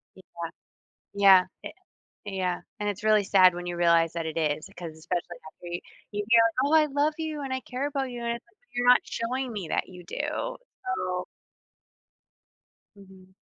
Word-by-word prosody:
Yeah, 190 - -14 0.9
yeah, 195 -2 +7 0.2
i - - -6 0.6
yeah, 185 -2 -1 0.2
and 205 0 0
it's 205 +1 -5
really 215 -1 +4
sad 185 -2 +6
when 175 0 -5
you 175 -1 -4
realize 170 -1 +4
that 165 -1 -3
it 160 0 -4
is 155 -1 -1
'cause 170 -2 -6
especially 175 +1 -4
after 175 - -14
y 175 - -2 0.3
you 205 0 -3
hear, 230 -1 +7 0.2
"Oh, 300 - +1
I 310 -1 +7
love 290 +2 +1
you, 310 -2 -3
and 265 -1 -3
I 260 - -2
care 265 +3 -3
about 270 -2 -2
you." 240 - -6
and 235 0 0
it's, 235 - -11
like, 425 - -31 0.2
"You're 245 0 +1
not 250 - +7
showing 250 +2 -3
me 195 -6 -5
that - - 0
you 180 -1 -11
do," 300 - -3 0.3
so 180 - -2 1.7
Mhm. 190 -1 -17
200 Hz, 185 wpm, -27 LUFS, 175-260 Hz, 1.7 s, yeah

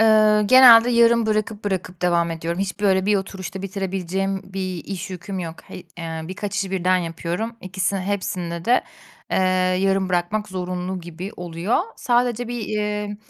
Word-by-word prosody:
Eee, 215 -1 +5
genelde 245 -2 +9
yarım 235 -1 +4
bırakıp 215 0 -1
bırakıp 185 -3 -3
devam 170 -1 +2
ediyorum. 165 +2 -3
Hiç, 195 +1 -3
böyle, 190 -1 +2
bir 210 - +4
oturuşta 190 0 -5
bitirebileceğim 195 0 -2
bir 185 -3 -4
iş 190 -1 -6
yüküm 185 +1 -6
yok. 165 -2 -5
He - - -10 0.2
eee, 165 -1 -5
birkaç 195 +3 -5
işi 195 -1 -1
birden 185 -1 +2
yapıyorum, 175 +7 -4
ikisi 185 +1 -2
hepsinide 185 -3 -3
de, 245 +4 +3 0.5
eee, - - +1 0.5
yarım 195 -1 +1
bırakmak 180 +4 -1
zorunlu 185 0 -4
gibi 175 +3 -7
oluyor. 175 +4 -1 0.2
Sadece 245 -1 +1
bir, 240 -1 -4
eee, 210 -1 -2
190 Hz, 155 wpm, -22 LUFS, 180-210 Hz, 0.5 s, genelde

